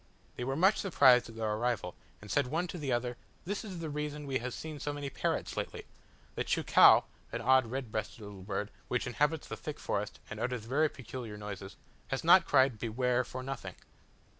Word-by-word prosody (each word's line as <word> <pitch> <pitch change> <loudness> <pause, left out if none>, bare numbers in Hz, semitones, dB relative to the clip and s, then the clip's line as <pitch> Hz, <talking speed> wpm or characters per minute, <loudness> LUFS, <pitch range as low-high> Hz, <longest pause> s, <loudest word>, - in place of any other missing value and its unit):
They - - -4
were 135 +2 -1
much 190 +7 +4
surprised 130 - +5
at 115 - -11
our 110 -1 -1
arrival, 115 -6 -1 0.3
and 105 - -8
said 145 -3 +2
one 165 +7 0
to 175 - -5
the 140 -3 -2
other, 120 0 -1 0.3
"This 200 +3 -3
is 195 -5 -7
the 160 - -3
reason 150 0 -4
we 135 -2 -1
have 125 +1 -4
seen 155 -2 -6
so 145 - -2
many 145 -1 -5
parrots - - -2
lately; - - -4 0.5
the - - -2
cheucau - - +6 0.3
(an - - -3
odd 130 -1 +4
red 125 -1 -4
breasted 110 +1 -4
little 100 -2 -9
bird, 100 +1 -3 0.2
which 125 - -1
inhabits 150 +5 0
the - - -5
thick 150 - -6
forest, 105 +1 -3
and 110 - -7
utters 120 -1 -2
very 150 +6 +2
peculiar 120 -5 -7
noises) 100 -2 -7 0.3
has 135 - -2
not 170 +1 +7
cried 130 -5 +4
'beware' 125 +2 +1
for 130 +1 -7
nothing." 135 0 -6
130 Hz, 200 wpm, -32 LUFS, 115-145 Hz, 0.5 s, not